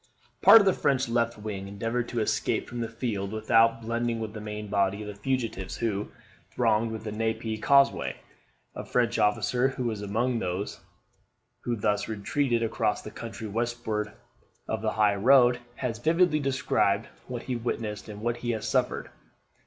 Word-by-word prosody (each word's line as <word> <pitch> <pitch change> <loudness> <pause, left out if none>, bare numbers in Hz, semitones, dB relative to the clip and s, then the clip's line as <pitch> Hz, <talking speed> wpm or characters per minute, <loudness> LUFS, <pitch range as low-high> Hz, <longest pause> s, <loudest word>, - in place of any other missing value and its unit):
Part 225 - +10
of - - +1
the 190 - +4
French 135 -5 +1
left 115 0 0
wing 105 -2 -5
endeavoured 115 +5 -2
to 120 - -1
escape 110 - 0
from 120 - -6
the 115 -1 -2
field 110 -4 -3
without 115 +1 +3
blending 115 0 -1
with 110 -1 -5
the 105 - -7
main 105 0 -6
body 100 0 0
of - - -8
the 105 - -5
fugitives 110 -4 -3
who 105 -3 -2 0.4
thronged 110 -1 +1
the 110 - -5
Genappe 110 0 -2
causeway. 140 0 +3 0.6
A - - -6
French 120 -1 +1
officer, 120 +4 +2
who 130 -1 -4
was 110 -4 -2
among 115 +4 0
those 95 +2 -3 0.9
who 120 - 0
thus 105 -1 0
retreated 115 +3 0
across 110 -1 0
the 110 - -8
country 110 -1 -7
westward 110 -1 -2 0.6
of 110 - -2
the 110 -1 -1
high 105 -2 +3
road, 125 +3 +5 0.2
has 120 -4 -3
vividly 165 +3 +3
described 120 -6 +1 0.2
what 120 -2 -5
he 130 - -3
witnessed 110 -3 -4
and 105 0 -8
what 120 +1 -1
he 120 -2 -2
suffered. - - -1
115 Hz, 165 wpm, -27 LUFS, 105-120 Hz, 0.9 s, Part